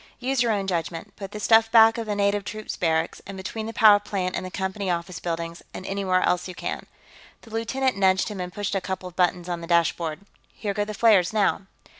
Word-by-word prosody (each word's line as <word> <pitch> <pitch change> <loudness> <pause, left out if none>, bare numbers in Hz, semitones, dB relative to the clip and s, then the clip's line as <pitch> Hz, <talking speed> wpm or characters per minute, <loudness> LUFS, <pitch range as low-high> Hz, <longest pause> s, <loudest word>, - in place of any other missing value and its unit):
Use 260 +1 0
your 235 -2 +2
own 200 -2 0
judgment. 170 -2 -3
Put 195 -1 -8
the 210 - -6
stuff 225 +1 +4
back 225 0 +6
of 225 - -4
the 210 - -1
native 200 0 +1
troops 215 +1 -6
barracks, 160 -1 0
and 195 0 -7
between 215 +3 -5
the - - -4
power 215 -3 +6
plant 190 -3 -3
and - - -3
the 185 - -5
Company 190 +1 -3
office 170 0 -3
buildings, 170 0 -4
and 185 - -7
anywhere 190 -2 0
else 180 0 +1
you 180 - -8
can." - - -5 0.5
The 225 - -16
lieutenant 250 +3 -1
nudged 190 +1 +3
him 205 -2 -6
and 180 0 -5
pushed 205 +1 -3
a 195 - 0
couple 185 0 -4
of 175 - -20
buttons 180 -1 +1
on 175 -1 -3
the 165 - -7
dashboard. 170 -1 +1 0.3
"Here 205 -2 -3
go 205 0 -1
the 215 0 -6
flares, 205 -4 +4
now." 200 -2 +1
195 Hz, 230 wpm, -25 LUFS, 180-215 Hz, 0.5 s, back